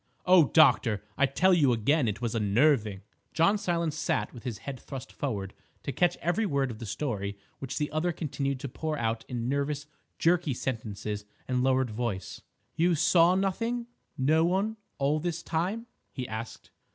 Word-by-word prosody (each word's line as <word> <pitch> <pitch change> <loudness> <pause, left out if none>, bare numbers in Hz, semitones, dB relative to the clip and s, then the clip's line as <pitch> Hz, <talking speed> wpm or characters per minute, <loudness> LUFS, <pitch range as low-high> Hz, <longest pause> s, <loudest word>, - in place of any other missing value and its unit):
Oh, 180 -3 +7
doctor, 125 - +4
I 140 - +3
tell 185 +8 +3
you 145 -7 +4
again, 130 +5 +2
it 105 +1 -2
was 115 - -1
unnerving!" 110 -1 +2 0.3
John 180 +6 +3
Silence 170 -6 -1
sat 155 0 -1
with 120 0 -11
his 120 -4 -3
head 135 -3 -5
thrust 135 -2 -8
forward 100 -8 -3 0.3
to - - -2
catch 175 +4 +2
every 205 +6 +1
word 140 -5 0
of 110 - -9
the 115 - -6
story 100 -5 -3 0.2
which 135 - -5
the 150 - -1
other 155 +3 0
continued 140 -4 -2
to 140 - -3
pour 155 +4 -3
out 115 -2 -1
in 120 -1 -3
nervous, 140 +2 -1 0.3
jerky 165 -5 +2
sentences 105 -4 -4 0.2
and 125 -1 +1
lowered 130 -2 +2
voice. 105 -4 -4 0.3
"You 170 +1 +3
saw 170 +3 +5
nothing—no 195 - 0
one—all 185 -6 0
this 170 +1 -3
time?" 185 +8 -1 0.3
he 125 -1 -5
asked. 110 +1 -7
140 Hz, 165 wpm, -29 LUFS, 120-170 Hz, 0.3 s, Oh